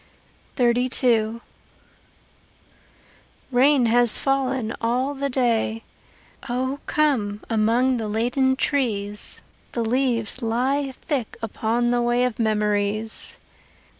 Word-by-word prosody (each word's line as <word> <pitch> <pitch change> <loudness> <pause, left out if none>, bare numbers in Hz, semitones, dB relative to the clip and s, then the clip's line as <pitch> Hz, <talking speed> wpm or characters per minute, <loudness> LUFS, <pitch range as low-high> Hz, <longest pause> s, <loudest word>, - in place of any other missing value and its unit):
XXXII 240 -2 +2 2.1
Rain 260 +1 +4
has 240 0 +3
fallen 265 -4 -1
all 250 +4 0
the 280 0 -2
day. 230 -3 0 0.7
O 260 +3 -2
come 255 -11 +1
among 235 +4 +2
the 220 -2 -3
laden 245 +5 +1
trees: 210 -8 -1 0.3
The 235 -1 -1
leaves 245 -1 0
lie 260 +5 0
thick 275 -8 -2
upon 230 +2 -1
the 245 0 +2
way 240 +1 +2
Of 250 -2 -3
memories. 210 0 0
240 Hz, 95 wpm, -23 LUFS, 220-260 Hz, 2.1 s, Rain